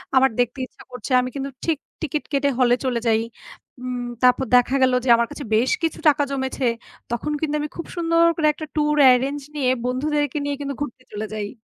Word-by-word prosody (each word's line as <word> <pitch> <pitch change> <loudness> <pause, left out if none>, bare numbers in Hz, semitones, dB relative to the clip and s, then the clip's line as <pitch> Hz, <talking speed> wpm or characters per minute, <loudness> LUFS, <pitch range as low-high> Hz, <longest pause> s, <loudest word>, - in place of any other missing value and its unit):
আমার 265 0 +6
দেখতে 245 +2 +1
ইচ্ছা - - -17
করছে, 250 0 -7
আমি 255 - -3
কিন্তু 275 0 -3 0.2
ঠিক 325 -3 +1 0.2
টিকিট 305 -1 -2
কেটে 280 0 +2
হলে 245 -1 +5
চলে 245 -2 0
যাই। 220 0 +3 0.6
উম 250 -1 -4 0.2
তারপর 250 +1 +4
দেখা 250 +2 +4
গেলো 255 -1 +4
যে - - 0
আমার 235 0 +1
কাছে - - -7
বেশ 245 +4 +2
কিছু 325 - -1
টাকা 290 -1 +4
জমেছে, 265 -1 -2 0.5
তখন 240 +6 -2
কিন্তু 300 -1 -1
আমি 300 0 -3
খুব 335 - -5
সুন্দর 335 0 +3
করে 310 -2 +2
একটা 310 - -7
tour 300 0 +2 0.2
arrange 270 +3 0
নিয়ে 265 -4 +1 0.2
বন্ধুদেরকে 290 +3 -1
নিয়ে 285 0 -1
কিন্তু 280 0 -3
ঘুরতে 255 -2 -8
চলে 210 +1 -3
যাই। 210 +3 -5
265 Hz, 200 wpm, -22 LUFS, 250-295 Hz, 0.6 s, আমার